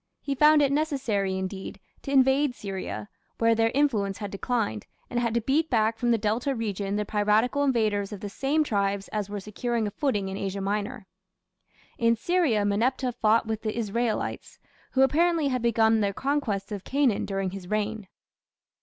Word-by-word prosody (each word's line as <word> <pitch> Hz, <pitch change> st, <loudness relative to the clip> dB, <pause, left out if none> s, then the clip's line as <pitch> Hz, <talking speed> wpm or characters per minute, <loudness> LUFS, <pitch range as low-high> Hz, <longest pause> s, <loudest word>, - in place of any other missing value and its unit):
He 280 Hz, -, -3 dB
found 300 Hz, +2 st, +5 dB
it 280 Hz, -, +2 dB
necessary, 260 Hz, -, 0 dB
indeed, 190 Hz, +1 st, -5 dB, 0.2 s
to -, -, -7 dB
invade 265 Hz, 0 st, +3 dB
Syria, 190 Hz, -, -5 dB, 0.3 s
where 230 Hz, 0 st, +3 dB
their 225 Hz, 0 st, +2 dB
influence 215 Hz, -9 st, +1 dB
had 205 Hz, -2 st, -6 dB
declined, 205 Hz, -, -2 dB, 0.2 s
and 240 Hz, -, 0 dB
had 235 Hz, -1 st, -1 dB
to 235 Hz, -, +2 dB
beat 300 Hz, +7 st, +1 dB
back 225 Hz, -2 st, +1 dB
from 240 Hz, -, 0 dB
the 235 Hz, -, +4 dB
Delta 225 Hz, +6 st, -1 dB
region 205 Hz, -3 st, -2 dB
the 210 Hz, 0 st, -1 dB
piratical 215 Hz, +6 st, +2 dB
invaders 215 Hz, -7 st, +1 dB
of 205 Hz, -, -6 dB
the 205 Hz, -, -5 dB
same 275 Hz, +9 st, 0 dB
tribes 200 Hz, -5 st, -1 dB
as 210 Hz, -2 st, -3 dB
were 205 Hz, 0 st, -4 dB
securing 225 Hz, +3 st, -2 dB
a 205 Hz, -, -3 dB
footing 210 Hz, -4 st, -1 dB
in 190 Hz, 0 st, -4 dB
Asia 195 Hz, 0 st, -3 dB
Minor. 205 Hz, +3 st, -3 dB, 0.9 s
In 230 Hz, 0 st, +4 dB
Syria, 255 Hz, -, +1 dB
Meneptah 245 Hz, +5 st, +1 dB
fought 225 Hz, -1 st, +2 dB
with 220 Hz, -1 st, -3 dB
the 215 Hz, 0 st, -3 dB
Israelites, 230 Hz, +1 st, -2 dB, 0.4 s
who 265 Hz, -, +4 dB
apparently 325 Hz, +1 st, +2 dB
had 255 Hz, -2 st, -1 dB
begun 225 Hz, -1 st, +3 dB
their 200 Hz, -1 st, 0 dB
conquest 230 Hz, -7 st, -2 dB
of 200 Hz, -3 st, -5 dB
Canaan 270 Hz, -6 st, +1 dB
during 195 Hz, -2 st, -2 dB
his 190 Hz, -2 st, -8 dB
reign. 215 Hz, 0 st, -2 dB
220 Hz, 175 wpm, -26 LUFS, 200-260 Hz, 0.9 s, found